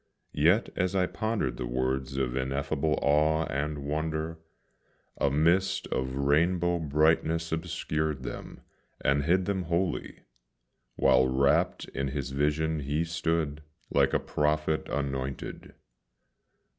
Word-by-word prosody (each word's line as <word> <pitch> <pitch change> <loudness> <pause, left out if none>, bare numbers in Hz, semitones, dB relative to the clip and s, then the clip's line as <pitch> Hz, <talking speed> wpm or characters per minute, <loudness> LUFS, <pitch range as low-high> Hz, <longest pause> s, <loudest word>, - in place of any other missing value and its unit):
Yet 85 +10 +3
as 90 +2 0
I 95 -1 +3
pondered 105 - -2
the 60 - -3
words 65 +2 -1
of 65 -2 -1
ineffable 70 +3 -1
awe 75 +2 +3
and 75 +2 -2
wonder, 80 +2 -2 0.8
A - - +3
mist 90 +7 +2
of 65 0 -2
rainbow 85 +5 +2
brightness 80 +2 +2
obscured 80 -3 -2
them, - - -7 0.4
and 70 +1 +1
hid 90 +3 +3
them 95 -2 -1
wholly, 85 +1 -2 0.7
While 65 -1 +4
wrapt 65 +2 +2
in 70 0 -2
his 65 -1 -3
vision 75 +3 0
he 75 +3 -1
stood, 80 -2 -1 0.3
like 70 -1 +3
a - - +4
prophet 75 +1 0
anointed. 70 -1 -4
75 Hz, 120 wpm, -28 LUFS, 70-80 Hz, 0.8 s, While